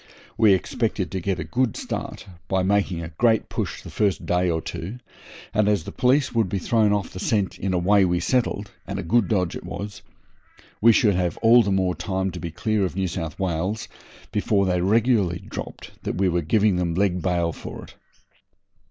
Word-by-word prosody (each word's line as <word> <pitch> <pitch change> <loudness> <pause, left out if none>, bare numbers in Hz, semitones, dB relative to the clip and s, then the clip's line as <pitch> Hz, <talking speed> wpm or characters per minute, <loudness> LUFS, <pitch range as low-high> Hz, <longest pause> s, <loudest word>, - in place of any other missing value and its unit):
We 105 -3 +5
expected 90 - -2
to 95 - -3
get 95 +1 -1
a - - -3
good 125 -3 0
start - - -5 0.2
by 95 -1 +1
making 95 -3 +1
a 80 - -6
great 115 -2 +3
push - - -4
the - - -9
first 100 -3 0
day 90 0 +1
or 80 -1 0
two, 90 +7 -6 0.6
and, 105 -1 +3
as 100 -6 +1
the - - -7
police 130 +2 +2
would 115 -5 +1
be 100 - -1
thrown 110 +2 +2
off 100 -4 -1
the 95 - -7
scent 100 -2 0
in 95 - -1
a 90 - +1
way 100 +3 +4
we 90 -1 +1
settled 110 0 0 0.2
and - - -4
a - - -3
good 105 +4 +2
dodge 90 -5 0
it - - -7
was 100 0 -6 0.8
we 115 +2 +7
should 105 -2 +4
have 90 -1 -1
all 120 +2 +7
the 100 - -1
more 95 -2 +1
time 95 0 -2
to 90 - -7
be 85 0 -4
clear 110 +5 -1
of 90 - -2
New 95 -1 0
South 80 -2 -5
Wales 95 +4 -2 0.4
before 105 -2 +1
they 90 -1 +1
regularly 105 -3 +2
dropped - - -7
that - - -3
we 95 +1 +2
were 85 -1 +1
giving 100 +4 +2
them 85 -2 -1
leg 90 -1 +1
bail 85 -2 0
for - - -8
it. - - -13
95 Hz, 205 wpm, -24 LUFS, 90-105 Hz, 0.8 s, we